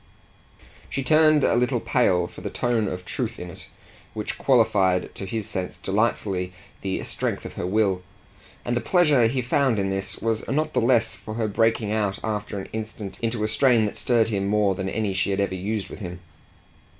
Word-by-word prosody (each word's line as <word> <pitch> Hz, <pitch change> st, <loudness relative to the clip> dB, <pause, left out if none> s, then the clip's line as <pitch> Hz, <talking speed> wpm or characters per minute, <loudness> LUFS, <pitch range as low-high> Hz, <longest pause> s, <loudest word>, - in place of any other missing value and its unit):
She 135 Hz, -, -2 dB
turned 155 Hz, +1 st, +5 dB
a -, -, +3 dB
little 125 Hz, +1 st, +2 dB
pale 95 Hz, -8 st, +2 dB
for -, -, -10 dB
the -, -, -4 dB
tone 120 Hz, -3 st, 0 dB
of 90 Hz, -1 st, -5 dB
truth -, -, -3 dB
in 90 Hz, 0 st, -6 dB
it -, -, -12 dB, 0.5 s
which 105 Hz, -1 st, -4 dB
qualified 100 Hz, -8 st, +3 dB
to 95 Hz, -, -6 dB
his 110 Hz, 0 st, -3 dB
sense 90 Hz, -1 st, -4 dB
delightfully 95 Hz, -3 st, -1 dB, 0.3 s
the 95 Hz, -1 st, -2 dB
strength -, -, -3 dB
of -, -, -7 dB
her 90 Hz, -, -3 dB
will; 95 Hz, -2 st, +2 dB, 0.6 s
and 120 Hz, -, 0 dB
the 120 Hz, -, 0 dB
pleasure 150 Hz, -6 st, +4 dB
he 125 Hz, +2 st, -1 dB
found 130 Hz, -1 st, +2 dB
in 95 Hz, -1 st, 0 dB
this 95 Hz, 0 st, -3 dB
was 115 Hz, -1 st, -1 dB
not 155 Hz, +2 st, 0 dB
the -, -, +2 dB
less 115 Hz, -1 st, +3 dB
for 110 Hz, -, -8 dB
her 110 Hz, -1 st, 0 dB
breaking 115 Hz, 0 st, +1 dB
out 105 Hz, -3 st, 0 dB
after 105 Hz, -1 st, -3 dB
an 95 Hz, -, -5 dB
instant 110 Hz, -2 st, -6 dB
into 115 Hz, -1 st, -1 dB
a -, -, +2 dB
strain 115 Hz, 0 st, +4 dB
that 105 Hz, -, -3 dB
stirred 115 Hz, -2 st, +2 dB
him 100 Hz, -2 st, -1 dB
more 105 Hz, -1 st, +3 dB
than 95 Hz, +1 st, -3 dB
any 105 Hz, -1 st, -1 dB
she 95 Hz, +1 st, 0 dB
had 100 Hz, 0 st, 0 dB
ever 100 Hz, -1 st, 0 dB
used 100 Hz, +2 st, -2 dB
with -, -, -9 dB
him. 90 Hz, -4 st, -6 dB
110 Hz, 200 wpm, -24 LUFS, 95-120 Hz, 0.6 s, turned